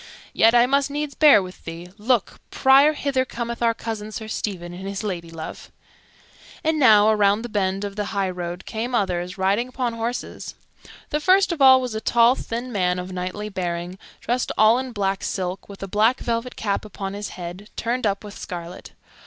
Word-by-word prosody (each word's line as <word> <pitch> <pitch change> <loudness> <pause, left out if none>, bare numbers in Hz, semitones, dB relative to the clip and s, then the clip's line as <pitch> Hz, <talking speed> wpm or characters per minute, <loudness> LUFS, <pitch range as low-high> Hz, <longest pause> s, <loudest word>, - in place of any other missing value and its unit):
"Yet, 225 +2 +5
I 240 0 +6
must 275 +2 +1
needs 295 0 -3
bear 290 -10 +6
with 185 0 -11
thee. 170 +2 -8
Look, 225 0 0
Prior, 275 +3 +5
hither 280 -3 0
cometh 235 -2 -5
our 230 -1 +2
cousin 215 -2 -5
Sir 220 0 -6
Stephen, 180 -5 -4
and 190 +2 -7
his 195 +1 -4
ladylove." 170 -5 -6 0.9
And 315 0 +1
now, 215 -5 +6
around 210 0 +3
the 240 - -5
bend 195 -2 -1
of 200 -1 -5
the 210 0 -2
highroad, 185 -3 -3
came 240 +3 -3
others, 180 -2 -1
riding 200 +6 +1
upon 250 -2 -2
horses. 230 +2 -5 0.6
The 300 - +1
first 375 +4 +4
of 330 -4 -3
all 260 -1 +8
was 250 -3 -4
a 220 - -3
tall, 235 +1 +4
thin 245 0 -5
man, 180 -4 +1
of 180 +1 -5
knightly 185 +3 -4
bearing, 180 -1 -4 0.2
dressed 245 +1 -1
all 220 +3 +5
in 260 -1 -5
black 195 -3 -1
silk, 185 0 -4
with 195 -1 -9
a - - -4
black 220 +6 +2
velvet 235 +1 -3
cap 200 -2 -2
upon 195 -2 -6
his 205 +1 -5
head, 180 +3 -8
turned 235 0 -1
up 200 0 -2
with 205 -1 -9
scarlet. 175 0 -8
210 Hz, 185 wpm, -23 LUFS, 190-245 Hz, 0.9 s, all